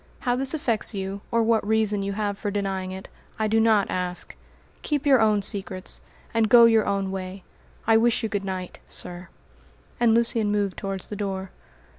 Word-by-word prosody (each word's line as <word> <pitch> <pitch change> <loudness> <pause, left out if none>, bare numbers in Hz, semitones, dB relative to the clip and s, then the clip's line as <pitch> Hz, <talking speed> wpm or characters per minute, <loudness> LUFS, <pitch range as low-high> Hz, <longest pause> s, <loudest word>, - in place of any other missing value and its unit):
How 245 -1 +1
this 270 +4 0
affects 230 -7 +1
you, 195 +1 -4
or 230 0 +2
what 225 0 +2
reason 210 -1 +1
you 200 0 -2
have 205 0 -2
for 205 - -4
denying 195 -2 -2
it, 190 0 -8 0.3
I 220 - 0
do 220 +1 +2
not 220 -3 +3
ask. 180 -1 -3 0.5
Keep 295 -1 -2
your 270 -4 +5
own 210 -2 +3
secrets, 190 -2 -2 0.3
and 225 -1 +2
go 235 0 +8
your 225 -2 +4
own 195 -1 -1
way. 190 0 -6 0.4
I 225 0 +5
wish 230 0 +2
you - - +1
good 205 -2 -2
night, 185 -2 -5
sir," 175 0 -5 0.7
and 230 -2 +4
Lucian 230 -2 +2
moved 205 -2 0
towards 195 -2 -4
the 210 - -7
door. 195 -2 -4
205 Hz, 185 wpm, -25 LUFS, 195-225 Hz, 0.7 s, go